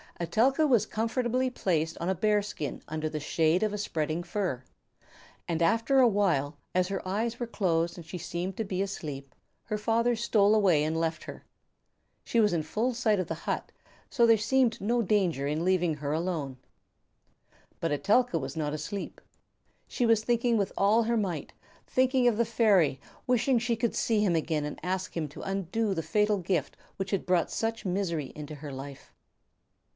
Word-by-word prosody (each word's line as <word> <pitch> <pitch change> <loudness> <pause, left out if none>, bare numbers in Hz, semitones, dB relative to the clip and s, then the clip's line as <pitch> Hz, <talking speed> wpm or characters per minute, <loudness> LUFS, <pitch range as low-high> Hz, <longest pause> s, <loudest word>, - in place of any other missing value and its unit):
Etelka 245 - +2
was 235 -6 +3
comfortably 240 +3 0
placed 165 -9 -1
on 170 - -2
a 190 - +1
bear 210 +3 +2
skin 155 -9 -5
under 155 0 -3
the 155 - -4
shade 160 +5 +1
of 215 -1 0
a - - -2
spreading 160 -5 -2
fir, 175 -9 -3 0.8
and 170 -1 -1
after 230 +10 +3
a 255 - +7
while, 170 -9 +1 0.2
as 185 0 +3
her 195 -1 -4
eyes 225 +5 -1
were 240 - -2
closed 170 -6 0
and 170 - -9
she 180 - -6
seemed 175 +3 -4
to 225 - -1
be 190 -2 -2
asleep, 145 -9 -6 0.3
her 215 -2 -2
father 230 +3 +1
stole 215 -2 +3
away 185 -8 +4
and 160 +1 -1
left 165 -1 -2
her. - - -9 0.8
She 235 - 0
was 210 -2 +4
in 165 - +1
full 225 +10 -1
sight 220 -4 +2
of 185 - -2
the - - -2
hut, - - -2 0.4
so 235 - +3
there 230 -1 +6
seemed 235 +2 +2
no 235 +4 +1
danger 180 -9 +1
in 155 +4 -1
leaving 180 -4 +2
her 145 0 -3
alone. 155 -5 -2 1.2
But 165 - -1
Etelka 205 - +2
was 135 -1 -5
not 150 -2 -2
asleep. 190 +7 -5 0.7
She 245 - -1
was 225 -2 +3
thinking 240 0 +2
with 200 -2 0
all 210 +4 +4
her 235 +1 +1
might, 180 -9 -3 0.3
thinking 255 -1 +2
of 230 -3 +2
the 235 - +2
fairy, 205 - +3 0.3
wishing 250 +1 +2
she 235 0 0
could 230 0 -1
see 220 -2 +1
him 180 -5 +2
again 155 -2 0
and 150 - -6
ask 185 0 -3
him 160 -2 -1
to 145 - -10
undo 195 +2 -1
the 165 -3 -3
fatal 210 +6 +2
gift 175 -5 -1 0.2
which 190 0 -4
had 195 - -1
brought 180 -2 +1
such 225 -1 -2
misery 175 -6 -2
into 150 0 -7
her 145 0 -8
life. 135 +1 -9
195 Hz, 185 wpm, -28 LUFS, 160-225 Hz, 1.2 s, a